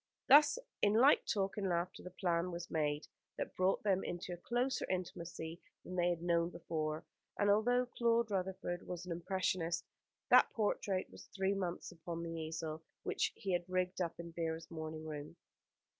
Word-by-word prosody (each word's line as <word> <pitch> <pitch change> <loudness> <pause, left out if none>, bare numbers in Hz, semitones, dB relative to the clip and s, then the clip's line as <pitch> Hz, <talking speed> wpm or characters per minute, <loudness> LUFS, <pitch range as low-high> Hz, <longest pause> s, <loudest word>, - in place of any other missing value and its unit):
Thus 295 - +8 0.2
in 205 - +4
light 260 +6 +6
talk 195 -1 0
and 195 -2 0
laughter 175 +1 -1
the 180 - -7
plan 175 -1 0
was 170 0 -6
made 150 -1 0 0.3
that - - -4
brought 185 +1 +2
them 195 -2 +2
into 175 +1 -4
a - - -6
closer 245 +8 0
intimacy 170 -2 -4 0.2
than 180 - -6
they 175 -1 +3
had 170 -1 -1
known 170 -1 +2
before, 155 -2 -3 0.3
and 205 -1 +4
although 245 +4 +4
Claude 235 -2 +1
Rutherford 185 -2 -2
was 180 0 -5
an 180 - -6
impressionist, 175 -1 0 0.5
that - - +8
portrait 205 -3 0
was - - -12
three 195 0 0
months 185 -3 -3
upon 170 0 -5
the 165 - -4
easel 160 -1 -4 0.2
which - - 0
he 195 - -3
had 175 0 -1
rigged 185 0 0
up 170 -1 -2
in 170 0 -6
Vera's 165 0 -3
morning 160 -1 -5
room. 150 0 -6
175 Hz, 175 wpm, -36 LUFS, 165-195 Hz, 0.5 s, Thus